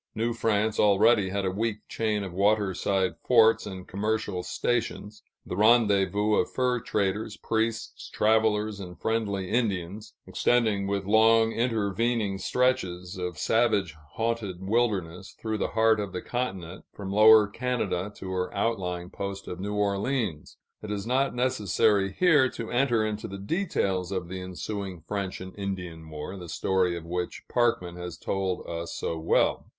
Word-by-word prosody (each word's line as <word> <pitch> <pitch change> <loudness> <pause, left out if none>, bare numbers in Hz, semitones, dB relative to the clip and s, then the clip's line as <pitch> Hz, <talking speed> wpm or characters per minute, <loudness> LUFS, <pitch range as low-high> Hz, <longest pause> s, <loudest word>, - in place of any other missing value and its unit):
New 115 +2 0
France 110 -2 0
already 105 0 +4
had 100 0 -2
a 95 - 0
weak 105 +2 -3
chain 105 -2 -1
of 95 -3 -6
waterside 100 -1 +1
forts 115 -3 +4
and 95 -2 -8
commercial 105 -2 -2
stations, 110 0 -2 0.2
the - - -5
rendezvous 105 -2 +3
of - - +1
fur 125 -1 0
traders, 105 0 -2
priests, 110 0 -2
travelers, 110 -1 +2
and 90 -2 -9
friendly 100 -4 -1
Indians, 105 -4 -2
extending, 110 -5 +1
with 100 -1 -1
long 110 +2 +5
intervening 115 -2 0
stretches 95 -6 0
of 90 -3 -4
savage 105 -4 +2 0.2
haunted 115 -3 -2
wilderness, 100 -6 -1
through 110 -1 -3
the - - 0
heart 110 -1 +4
of 100 -2 -4
the 90 - -3
continent, 95 -8 -4
from 95 -1 -7
Lower 110 0 +7
Canada 105 -4 -2
to 95 - -7
her 90 -1 -2
outlying 90 -5 -2
post 100 0 -5
of 90 - -6
New 100 +2 -3
Orleans. 100 - -1 0.2
It 105 - -7
is 105 -1 -3
not 130 +2 +1
necessary 110 -5 +2
here 150 - +4
to 115 -2 -7
enter 120 -3 +2
into 110 0 -3
the 100 - -7
details 100 - -1
of 90 -3 -3
the 95 0 -5
ensuing 95 0 -5
French 100 +3 -4
and 95 0 -9
Indian 90 -5 -5
War, 75 +5 -6
the 90 -2 -9
story 90 +1 +1
of 85 - -8
which 90 +1 -4
Parkman 115 -8 0
has 90 -1 -6
told 95 -2 -2
us 85 0 -5
so 80 - -3
well. 80 - +1
100 Hz, 150 wpm, -27 LUFS, 95-115 Hz, 0.2 s, Lower